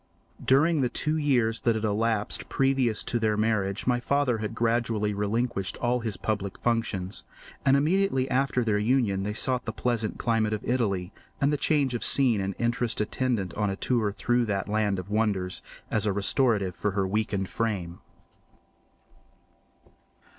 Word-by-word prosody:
During 150 +4 +3
the 125 - +1
two 155 +5 -1
years 125 -7 +1
that 115 -1 +1
had 110 - -3
elapsed 110 0 -1
previous 135 -5 +1
to 120 - -1
their 110 -2 +1
marriage 105 -3 0
my 125 -1 +2
father 130 -2 +1
had 110 +1 -4
gradually 115 -2 0
relinquished 105 -1 -1
all 125 +1 0
his 110 -5 -3
public 100 -1 -3
functions; 100 - -1 0.4
and 135 0 +4
immediately 155 -3 +1
after 130 -1 +1
their 105 -2 +1
union 110 -4 +1
they 105 +2 -2
sought 125 +3 0
the 110 - -2
pleasant 115 -1 -2
climate 110 -2 +1
of 105 - -4
Italy, 100 -7 0 0.3
and 140 +2 +2
the - - +3
change 140 -2 +1
of 120 - -2
scene 125 -7 +4
and 95 0 -3
interest 120 -1 -1
attendant 105 -4 -1
on 105 -1 0
a 95 - -2
tour 110 -1 0
through 120 +3 +1
that 100 -3 -2
land 105 -2 0
of 90 +2 -7
wonders, 105 -4 0 0.3
as 110 0 +1
a 100 - +1
restorative 100 -2 +1
for 105 -2 -1
her 95 -1 +1
weakened 100 -1 -1
frame. 90 -4 -3
110 Hz, 160 wpm, -27 LUFS, 105-125 Hz, 0.4 s, and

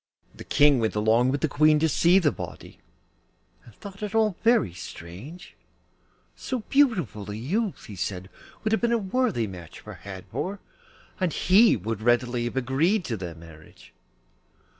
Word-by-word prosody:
The - - -11
King 145 -3 +4
went 110 -2 -1
along 110 +4 +3
with 140 +1 -1
the 155 - +2
Queen 155 +1 +4
to 160 +2 +2
see 170 +4 +4
the 165 -6 +3
body, - - -9 0.8
and 115 - -17
thought 200 0 -11
it 210 0 -4
all 215 -4 +2
very 230 - +3
strange; 100 - -10 0.8
so 255 -3 -4
beautiful 180 - +1
a 105 - -4
youth, 185 - -2
he 105 - -9
said, 90 +1 -4 0.4
would 215 - 0
have 220 - +1
been 235 0 +1
a 235 - +3
worthy 210 - 0
match 90 -5 -10
for - - -10
Hadvor, 100 - -5 0.6
and 185 -3 0
he 200 - +4
would 110 +2 -4
readily 120 +1 +1
have 120 - -4
agreed 155 - +1
to 115 - -2
their 90 -5 -6
marriage. 80 -2 -16
140 Hz, 160 wpm, -25 LUFS, -, 0.8 s, King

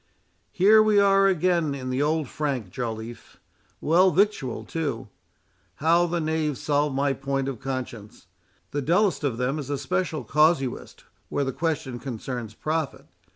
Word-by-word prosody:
"Here 210 +4 +6
we 215 -1 +4
are 195 0 +5
again 175 -5 +1
in 130 -2 -5
the 130 +2 0
old 155 0 +1
frank, 135 -11 -3
Joliffe; 115 -2 -6 0.4
well 180 +5 +4
victualled 180 - 0
too. 140 -9 -3 0.7
How 170 +3 +3
the 170 0 -1
knave 155 -3 -1
solved 145 -1 0
my 140 0 +1
point 135 0 -2
of 135 -5 -4
conscience!—the 130 +2 -7
dullest 180 +5 +2
of 130 -6 -1
them 130 +4 -1
is 140 -2 -6
a 145 - -1
special 155 +2 -2
casuist 150 0 +1 0.3
where 140 - 0
the 135 -1 -2
question 145 -7 -2
concerns 120 -2 -6
profit. 155 0 -3
145 Hz, 145 wpm, -25 LUFS, 130-165 Hz, 0.7 s, Here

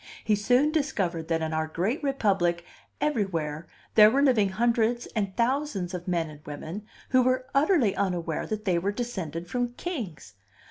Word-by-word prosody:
He 215 - +2
soon 245 +8 +3
discovered 190 - -1
that 165 -1 0
in 160 0 -2
our 160 0 0
great 190 - -1
republic 195 - +1 0.3
everywhere 170 - -1 0.3
there 210 -1 +8
were 275 +5 +2
living 230 -8 +4
hundreds 235 +3 +1
and 200 -3 -2
thousands 235 -7 0
of 180 0 -5
men 170 -3 0
and 150 0 -14
women 160 +8 -7 0.2
who 255 -1 +5
were 255 0 +1
utterly 275 - +3
unaware 175 -4 -1
that 215 0 -4
they 180 -3 +2
were 195 +4 -1
descended 185 -8 -4
from 245 +1 -2
kings. 240 - -6
205 Hz, 165 wpm, -27 LUFS, 170-245 Hz, 0.3 s, there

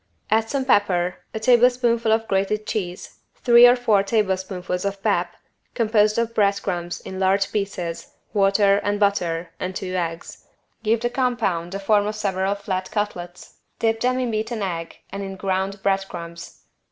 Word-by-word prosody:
Add 225 +1 +2
some 275 -2 -1
pepper, 185 -7 +2
a 220 - -4
tablespoonful 240 -1 +3
of 225 0 +1
grated 200 +2 0
cheese, 180 -4 -5 0.2
three 240 0 +7
or 245 - +6
four 225 -5 +3
tablespoonfuls 190 -3 -1
of 200 0 -4
pap, 175 -5 0 0.4
composed 215 -2 +2
of 230 0 0
bread 200 -2 +2
crumbs 175 -2 -3
in 190 - -7
large 195 +1 +2
pieces, 180 -5 -4 0.2
water 200 0 +4
and 205 0 -1
butter, 175 -5 0
and 185 0 -4
two 185 -1 -4
eggs. 170 -2 -4 0.3
Give 225 +1 +1
the 240 +1 -2
compound 230 -9 -1
the 195 - -3
form 205 +1 +2
of 215 - -3
several 195 -1 -1
flat 190 -2 -4
cutlets, 180 -4 -5 0.2
dip 225 0 +1
them 255 +2 +1
in 250 -2 -1
beaten 215 0 -2
egg 165 -3 -4
and 200 - -5
in 195 -1 -5
ground 190 +1 -2
bread 195 -1 +1
crumbs. 170 0 -9
200 Hz, 165 wpm, -22 LUFS, 185-220 Hz, 0.4 s, three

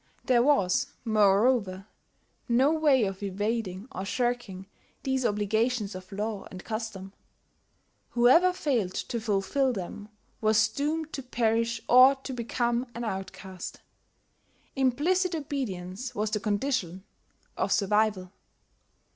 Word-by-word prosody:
There 250 -3 +4
was, 240 -10 +2 0.2
moreover, 205 -2 +2 0.6
no 260 +5 +4
way 295 -6 +3
of 195 -1 -3
evading 205 0 -3
or 190 - -5
shirking 230 -3 -2 0.4
these 265 -2 +1
obligations 210 +1 0
of 185 +1 -10
law 210 0 -4
and 185 -1 -10
custom: 215 -4 -5 1.0
whoever 260 +10 +5
failed 245 - -1
to 235 - -3
fulfil 220 +6 +1
them 205 +1 -7 0.3
was 215 0 +3
doomed 300 +6 -2
to 275 - -4
perish 230 -2 0
or 255 +2 +7
to 270 0 -7
become 240 +1 -1
an 235 - -4
outcast; 190 -3 -6 0.9
implicit 330 +8 +1
obedience 250 - -4
was 210 +1 -1
the 215 - 0
condition 205 -4 -2 0.5
of - - -1
survival. 210 -2 +1
225 Hz, 115 wpm, -28 LUFS, 195-255 Hz, 1.0 s, or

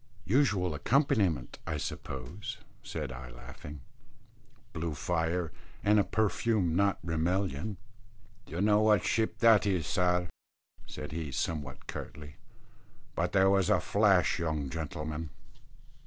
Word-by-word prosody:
"Usual 100 - +2
accompaniment, 100 - +1
I 80 -2 -1
suppose," 70 +6 -5 0.2
said - - -5
I, 60 -1 -8
laughing; - - -10 0.9
"blue 80 -2 -3
fire, 85 +1 -1 0.3
and 105 +1 +5
a - - +5
perfume 105 -4 +1
not 100 +1 +3
Rimmelian." 90 +2 -1 0.7
"Dunno 105 +6 +3
what 105 -3 +4
ship 110 -1 0
that 110 -3 +6
is, 90 -5 +1
sir," 90 0 +2 0.6
said 75 - -7
he 80 -2 -4
somewhat 70 -2 -3
curtly; 75 0 -8 0.8
"but - - 0
there 95 0 +5
was 95 -1 +3
a 105 -4 +4
flash, 100 -4 +3
young 75 -5 -2
gentleman." 80 0 -4
85 Hz, 115 wpm, -31 LUFS, 75-100 Hz, 0.9 s, that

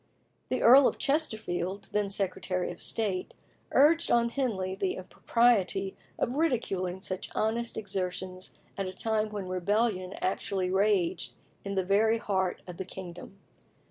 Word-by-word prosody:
The 255 - 0
Earl 260 +3 +9
of - - -1
Chesterfield, 200 - -1
then 210 -1 +1
Secretary 185 -2 -1
of - - -10
State, 200 -5 -2 0.4
urged 325 +4 +5
on 235 0 +4
Henley 215 -8 -1
the 190 -1 -1
impropriety 195 -1 +1 0.2
of 240 - 0
ridiculing 195 - 0
such 185 -1 -5
honest 230 +2 0
exertions 185 -2 -4 0.2
at 195 - -1
a 185 - -5
time 220 +1 0
when 205 -3 -5
rebellion 185 +1 0
actually 185 0 -1
raged 195 -2 +1 0.3
in 200 0 -4
the 190 -1 +1
very 220 +4 +3
heart 190 -4 -1
of 180 -2 -9
the - - -3
kingdom. 185 +1 -9
195 Hz, 140 wpm, -29 LUFS, 185-225 Hz, 0.4 s, Earl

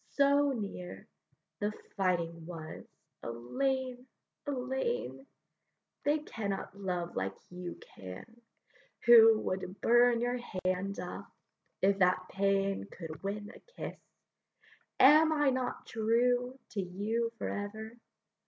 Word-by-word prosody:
so 280 0 +4
near 195 -4 -6 0.5
The 205 0 0 0.2
fighting 170 -4 0
was: 165 -3 -7 0.4
Ellayne! 255 - -2 0.4
Ellayne! 270 - -2 0.8
They 295 +1 +4
cannot 200 -10 -4
love 180 -3 -3
like 95 0 -2 0.2
you 180 -1 -7 0.2
can, 95 - -10 0.6
who 225 -2 +9
Would 185 +1 -3
burn 240 0 +5
your 245 +1 0 0.3
hands 185 +2 0
off, 180 0 -6 0.5
if 195 +1 +4
that 185 0 +3
pain 195 0 +1
Could 160 -3 -8
win 205 +1 -4
a - - -13
kiss; 480 - -8 1.0
am 305 +4 +8
I 295 -3 +3
not 255 -1 -2
true 245 +3 +1
To 205 - -1
you 210 +6 -1
for - - -3
ever? 220 +2 -5
210 Hz, 110 wpm, -32 LUFS, 185-250 Hz, 1.0 s, who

